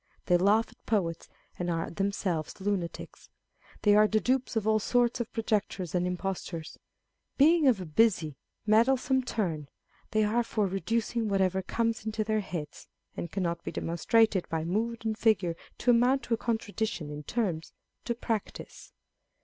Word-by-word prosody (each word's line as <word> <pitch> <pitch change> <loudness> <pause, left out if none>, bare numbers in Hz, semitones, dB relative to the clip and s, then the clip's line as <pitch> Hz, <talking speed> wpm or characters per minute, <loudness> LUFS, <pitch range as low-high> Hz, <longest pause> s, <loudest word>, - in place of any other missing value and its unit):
They 180 - +4
laugh 205 +5 +4
at - - -22
poets, 170 -7 -1 0.3
and 175 0 -1
are 165 -1 -2
themselves 190 -4 -2
lunatics. 190 -3 -4 0.5
They 205 - +6
are 215 0 +6
the 215 +1 +2
dupes 255 +1 0
of 220 -2 0
all 215 0 +4
sorts 240 +2 +1
of 240 - -3
projectors 210 -6 -1
and 180 0 +1
impostors. 180 -3 -4 0.6
Being 310 +1 +5
of 240 -6 +4
a 185 - -5
busy, 160 -3 +2 0.3
meddle 230 +5 +4
some 260 +1 +1
turn, 170 - -2 0.4
they 215 0 +2
are 220 +3 +2
for 215 -2 0
reducing 225 +4 -1
whatever 190 -1 +1
comes 230 +4 -1
into 220 0 -2
their 215 0 0
heads 170 -7 -6 0.3
(and 170 - -5
cannot 170 -3 -2
be - - -4
demonstrated 195 +4 +2
by 160 -1 -1
mood 225 +6 -2
and 220 -1 0
figure 185 -7 +2 0.2
to 245 - +3
amount 245 +2 +3
to 235 - -2
a - - +2
contradiction 220 -8 -2
in 150 0 -6
terms) 170 -2 -2 0.3
to 235 - -1
practice. 225 -3 -5
210 Hz, 160 wpm, -29 LUFS, 180-230 Hz, 0.6 s, They